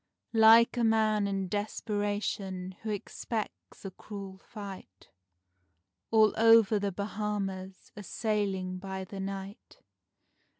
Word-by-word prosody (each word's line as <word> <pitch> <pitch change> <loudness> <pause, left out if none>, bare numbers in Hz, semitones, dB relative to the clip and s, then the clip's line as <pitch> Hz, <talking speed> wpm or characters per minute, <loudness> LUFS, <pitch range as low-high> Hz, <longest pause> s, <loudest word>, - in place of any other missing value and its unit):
Like 225 +2 +7
a 240 - +2
man 215 -2 +3
in 195 -1 -2
desperation 205 -2 -2
who 220 - -5
expects 210 +1 -5
a 195 - -5
cruel 195 0 -9
fight, 195 - -10 1.0
All 220 -2 +5
over 225 -2 +6
the 200 0 -1
Bahamas 195 -1 -4
a 210 - -7
sailing 195 -3 -2
by 190 0 -5
the 195 +1 -8
night. 195 +1 -7
205 Hz, 110 wpm, -30 LUFS, 190-215 Hz, 1.0 s, Like